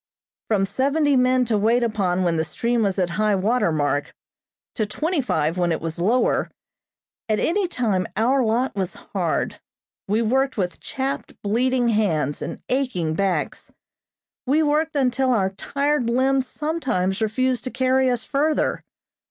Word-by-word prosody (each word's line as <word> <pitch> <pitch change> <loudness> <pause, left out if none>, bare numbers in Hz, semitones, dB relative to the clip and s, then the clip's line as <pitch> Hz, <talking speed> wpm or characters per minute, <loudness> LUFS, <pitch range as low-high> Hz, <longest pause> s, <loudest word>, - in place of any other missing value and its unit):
From 200 -3 +2
seventy 280 +7 +1
men 255 0 +3
to 220 -3 +1
wait 230 +4 +3
upon 190 -5 0
when 170 -2 +1
the 160 - +1
stream 235 +8 -1
was 200 -3 0
at 180 -2 0
high 210 -1 +3
water 210 0 +1
mark, 145 -2 0 0.6
to 215 -3 -1
twenty 310 - -1
five 165 - -1
when 175 -1 +1
it 160 - 0
was 165 0 -5
lower, 225 +8 +2 0.8
at 215 - +2
any 375 +3 +1
time 210 - 0
our 255 +4 +3
lot 235 +3 0
was 190 -2 -2
hard. - - -2 0.5
We 215 +4 +1
worked 265 +4 +1
with 180 -3 -2
chapped, 270 +1 -4
bleeding 245 +3 +1
hands 160 - 0
and - - -6
aching 250 - -1
backs. 195 +2 -2 0.8
We 300 +4 +3
worked 305 +1 +1
until 265 -1 +1
our 195 -6 +2
tired 280 +5 -1
limbs 260 +2 +2
sometimes 250 - -1
refused 250 +3 0
to - - -2
carry 260 +1 +2
us 245 -2 -1
further. 295 +2 0
235 Hz, 150 wpm, -23 LUFS, 195-265 Hz, 0.8 s, men